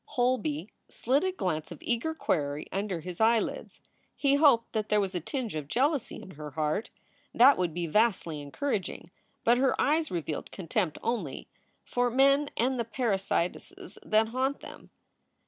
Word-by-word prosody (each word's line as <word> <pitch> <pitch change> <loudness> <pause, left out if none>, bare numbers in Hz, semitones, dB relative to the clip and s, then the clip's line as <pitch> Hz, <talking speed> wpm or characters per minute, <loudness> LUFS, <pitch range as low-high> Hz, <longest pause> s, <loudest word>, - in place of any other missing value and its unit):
Holby 215 - 0 0.2
slid 265 +6 +1
a 375 - +1
glance 175 - -3
of 170 - -7
eager 245 +7 -1
query 145 - -1
under 195 -3 -2
his 180 +4 -6
eyelids. 230 - +1 0.3
He 280 -1 +2
hoped 280 -6 +4
that 215 -1 -2
there 210 - +3
was 195 -1 -1
a 180 - -1
tinge 235 - -4
of 150 -3 -4
jealousy 275 - 0
in 190 - -11
her 150 -2 -8
heart. 155 +7 -1 0.5
That 265 +4 +8
would 180 -2 +1
be 170 +2 -3
vastly 175 -4 +1
encouraging. 180 - -3 0.3
But 240 +2 +4
her 265 0 +2
eyes 310 +1 +2
revealed 160 -3 -4
contempt 180 -2 -2
only, 205 - -3 0.4
for 245 0 +1
men 275 +3 +4
and 255 +2 +1
the - - +1
parasitesses 230 - -2
that 220 +1 +2
haunt 260 +4 -1
them. - - -11
220 Hz, 160 wpm, -29 LUFS, 175-265 Hz, 0.5 s, That